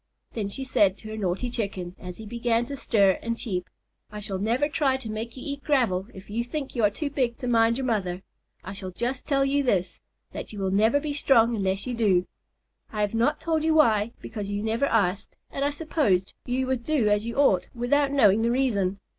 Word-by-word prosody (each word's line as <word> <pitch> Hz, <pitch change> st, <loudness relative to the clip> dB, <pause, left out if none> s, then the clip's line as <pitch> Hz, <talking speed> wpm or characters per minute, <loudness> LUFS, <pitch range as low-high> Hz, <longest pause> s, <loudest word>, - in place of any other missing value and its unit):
Then 215 Hz, -4 st, -2 dB
she 265 Hz, +7 st, -5 dB
said 205 Hz, -7 st, +2 dB
to 215 Hz, -, -10 dB
her 215 Hz, -, -5 dB
naughty 205 Hz, +4 st, -2 dB
Chicken, 195 Hz, -6 st, -4 dB
as 180 Hz, -1 st, -8 dB
he 220 Hz, -, -9 dB
began 235 Hz, +1 st, 0 dB
to 280 Hz, +3 st, -6 dB
stir 200 Hz, -8 st, +3 dB
and 230 Hz, 0 st, -2 dB
cheep, 180 Hz, -7 st, -3 dB, 0.4 s
"I 210 Hz, -, -6 dB
shall 200 Hz, -2 st, -3 dB
never 235 Hz, +8 st, +1 dB
try 285 Hz, -3 st, +1 dB
to 235 Hz, -5 st, -7 dB
make 225 Hz, +3 st, -5 dB
you 255 Hz, -, -8 dB
eat 280 Hz, -1 st, -5 dB
gravel 225 Hz, -10 st, +1 dB
if 190 Hz, -1 st, -12 dB
you 225 Hz, +3 st, -2 dB
think 275 Hz, +3 st, -5 dB
you 235 Hz, -, 0 dB
are 205 Hz, -, +6 dB
too 285 Hz, +8 st, -4 dB
big 250 Hz, -4 st, 0 dB
to 255 Hz, -, -5 dB
mind 230 Hz, -1 st, +3 dB
your 265 Hz, -, -2 dB
mother. 190 Hz, -6 st, -1 dB, 0.4 s
I 190 Hz, -, -7 dB
shall 190 Hz, -1 st, -6 dB
just 240 Hz, +8 st, -3 dB
tell 275 Hz, -2 st, +2 dB
you 280 Hz, +1 st, +2 dB
this, 190 Hz, -9 st, 0 dB, 0.3 s
that -, -, -7 dB
you 210 Hz, -, -9 dB
will 190 Hz, -1 st, -1 dB
never 220 Hz, +8 st, +3 dB
be 295 Hz, 0 st, -3 dB
strong 240 Hz, -5 st, +4 dB
unless 195 Hz, -1 st, -1 dB
you 250 Hz, -, -3 dB
do. 200 Hz, -6 st, +2 dB, 0.7 s
I 215 Hz, -, -2 dB
have 205 Hz, 0 st, 0 dB
not 235 Hz, +6 st, +1 dB
told 320 Hz, -2 st, 0 dB
you 320 Hz, 0 st, +2 dB
why, 230 Hz, -7 st, +4 dB
because 210 Hz, -3 st, -5 dB
you 205 Hz, 0 st, -2 dB
never 225 Hz, +5 st, +1 dB
asked, 200 Hz, -3 st, 0 dB
and 275 Hz, -, -2 dB
I 285 Hz, -, +2 dB
supposed 285 Hz, -, 0 dB
you 255 Hz, +1 st, 0 dB
would 255 Hz, -2 st, -1 dB
do 285 Hz, -6 st, +1 dB
as 210 Hz, +2 st, +1 dB
you 235 Hz, -, -4 dB
ought 235 Hz, -11 st, +3 dB
without 275 Hz, +4 st, +2 dB
knowing 225 Hz, -7 st, +5 dB
the 230 Hz, -, +2 dB
reason. 205 Hz, -7 st, +1 dB
230 Hz, 225 wpm, -26 LUFS, 200-265 Hz, 0.7 s, are